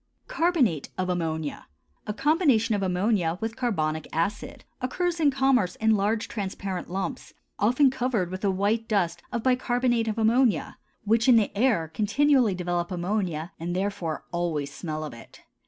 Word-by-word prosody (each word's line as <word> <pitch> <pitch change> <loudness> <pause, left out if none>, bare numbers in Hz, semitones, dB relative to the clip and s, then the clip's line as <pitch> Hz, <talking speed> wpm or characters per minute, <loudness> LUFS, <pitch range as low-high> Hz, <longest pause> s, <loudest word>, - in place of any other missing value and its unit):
CARBONATE 275 - +1
OF 185 -1 -1
AMMONIA, 160 -4 -3 0.4
a 210 - -1
combination 275 - +3
of 205 - 0
ammonia 180 -2 +1
with 225 0 -3
carbonic 160 - -1
acid, 200 +6 -3 0.2
occurs 340 +7 -1
in 300 -3 +4
commerce 265 -8 +2
in 220 0 +2
large 210 +2 0
transparent 195 -3 -4
lumps, 195 +8 -4 0.2
often 250 +6 +4
covered 240 -9 -1
with 185 +1 -6
a 200 - +3
white 205 +4 0
dust 175 -5 0
of 235 -2 -2
bicarbonate 245 -2 +1
of 220 0 -2
ammonia, 230 +1 +2 0.2
which 225 +4 +2
in 245 - +8
the 220 -3 +2
air 210 -7 +2
continually 220 - +2
develop 175 -1 -2
ammonia 180 -3 -2
and 175 +2 -3
therefore 185 -5 -3
always 165 -5 -2
smell 155 -3 -5
of 150 - -6
it. 115 - -14
205 Hz, 155 wpm, -26 LUFS, 175-245 Hz, 0.4 s, in